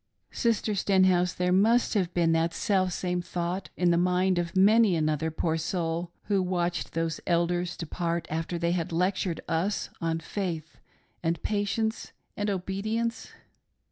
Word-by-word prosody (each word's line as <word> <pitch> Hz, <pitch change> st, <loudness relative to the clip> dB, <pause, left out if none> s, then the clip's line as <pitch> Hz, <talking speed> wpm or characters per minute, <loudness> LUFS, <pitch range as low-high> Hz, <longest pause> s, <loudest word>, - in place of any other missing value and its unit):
Sister 225 Hz, -2 st, 0 dB
Stenhouse, 185 Hz, -2 st, +3 dB
there 180 Hz, 0 st, 0 dB
must 225 Hz, +6 st, +3 dB
have 185 Hz, -5 st, +1 dB
been 170 Hz, -2 st, +3 dB
that 165 Hz, +1 st, +1 dB
selfsame 185 Hz, -3 st, 0 dB
thought 175 Hz, +2 st, -3 dB
in 175 Hz, -1 st, +3 dB
the 170 Hz, -, +3 dB
mind 180 Hz, +1 st, +2 dB
of 170 Hz, 0 st, -3 dB
many 205 Hz, +1 st, +5 dB
another 155 Hz, 0 st, 0 dB
poor 160 Hz, 0 st, -1 dB
soul 165 Hz, +1 st, -2 dB
who 200 Hz, -2 st, +1 dB
watched 175 Hz, -1 st, -1 dB
those 165 Hz, -1 st, -1 dB
Elders 175 Hz, +1 st, +1 dB
depart 170 Hz, 0 st, -2 dB
after 165 Hz, +2 st, -2 dB
they 170 Hz, 0 st, 0 dB
had^ 170 Hz, -2 st, -2 dB
lectured 180 Hz, 0 st, 0 dB
us 175 Hz, +6 st, -1 dB
on 165 Hz, -1 st, 0 dB
faith 165 Hz, -2 st, -4 dB, 0.4 s
and 165 Hz, 0 st, -1 dB
patience 215 Hz, +2 st, -1 dB, 0.2 s
and 205 Hz, 0 st, -1 dB
obedience 205 Hz, +5 st, -2 dB
180 Hz, 140 wpm, -28 LUFS, 170-195 Hz, 0.4 s, many